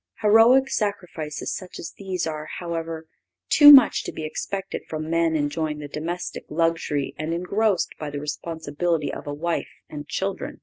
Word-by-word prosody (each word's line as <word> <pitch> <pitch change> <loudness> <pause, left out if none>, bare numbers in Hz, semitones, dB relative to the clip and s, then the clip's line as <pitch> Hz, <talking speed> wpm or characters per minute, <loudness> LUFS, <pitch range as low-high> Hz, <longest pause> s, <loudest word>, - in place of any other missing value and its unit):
Heroic 230 +5 +6
sacrifices 180 - -3
such 185 -1 -8
as - - -7
these 190 -3 -3
are, 155 -1 -5
however, 165 -2 -5 0.4
too 290 -1 +9
much 265 -4 +7
to - - -4
be 155 - -7
expected 195 +5 -4
from 155 0 -4
men 165 -1 +2
enjoying 150 +1 -1
the 150 -1 -7
domestic 165 +5 -5
luxury 165 -3 -1
and 160 +2 -2
engrossed 195 +2 0
by 150 - -4
the 145 0 -5
responsibility 155 +1 -3
of - - -8
a 145 - -3
wife 170 +3 -2 0.2
and 145 -1 -7
children. 195 0 -4
165 Hz, 160 wpm, -24 LUFS, 155-190 Hz, 0.4 s, too